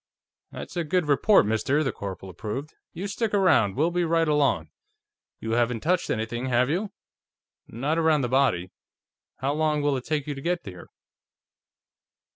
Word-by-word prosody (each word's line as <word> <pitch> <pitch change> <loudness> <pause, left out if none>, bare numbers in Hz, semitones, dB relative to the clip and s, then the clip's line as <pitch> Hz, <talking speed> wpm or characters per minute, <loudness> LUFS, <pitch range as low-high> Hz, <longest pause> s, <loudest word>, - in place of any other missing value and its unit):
"That's - - -8
a 170 - 0
good 175 +2 0
report, 150 - +4
mister," 120 +8 +1
the 135 - 0
corporal 95 -2 -7
approved. 115 - -6 0.2
"You 180 +4 -6
stick 210 +1 -1
around; 160 - +3
we'll 160 +5 +1
be 175 0 0
right 165 0 +2
along. 140 - +1 0.7
You 110 - -4
haven't 120 -1 +1
touched 180 +2 0
anything, 120 +3 -2
have 125 +2 +2
you?" 195 +5 -2 0.8
"Not 145 +8 -1
around 160 -2 +3
the 125 - 0
body. 120 -9 +1 0.7
How 135 +2 0
long 150 -1 0
will 145 -1 +2
it 125 - -6
take 150 -1 -2
you 150 - -3
to 135 - -8
get 175 +3 -1
here?" 90 -3 -9
145 Hz, 165 wpm, -26 LUFS, 120-165 Hz, 0.8 s, report